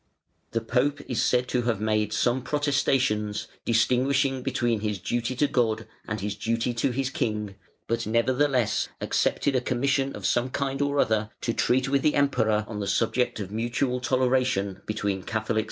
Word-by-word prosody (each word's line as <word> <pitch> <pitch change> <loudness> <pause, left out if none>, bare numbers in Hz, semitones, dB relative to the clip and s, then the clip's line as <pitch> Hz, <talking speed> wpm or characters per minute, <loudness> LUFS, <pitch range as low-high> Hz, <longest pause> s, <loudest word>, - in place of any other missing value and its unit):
The 115 - -1
Pope 135 +5 0
is 125 - 0
said 125 0 +2
to 125 - +1
have 110 -4 0
made 110 -1 0
some 120 +4 +1
protestations, 130 -7 0 0.2
distinguishing 130 +3 +2
between 120 -2 0
his 105 -1 -2
duty 120 +6 -2
to 145 - +2
God 115 -5 0 0.2
and 110 -2 -3
his 105 0 -2
duty 115 +3 -1
to 115 +3 0
his 130 +1 -2
king, 105 -9 -2 0.3
but 115 -1 -2
nevertheless 125 +1 +1
accepted 140 - +1
a 125 - +2
commission 135 +2 0
of 105 - -7
some 120 +7 +1
kind 135 +1 -2
or 145 0 0
other 110 -4 +2
to 115 - -1
treat 130 +3 +2
with 135 0 +2
the 150 - +2
Emperor 115 -7 +2
on 110 -2 -5
the 100 - -3
subject 120 +2 +1
of 100 -2 -5
mutual 120 +3 -1
toleration 125 -6 +1
between 100 -2 -1
Catholics 110 +3 -4
and - - +2
Arians. 110 - +2
120 Hz, 175 wpm, -26 LUFS, 110-130 Hz, 0.3 s, said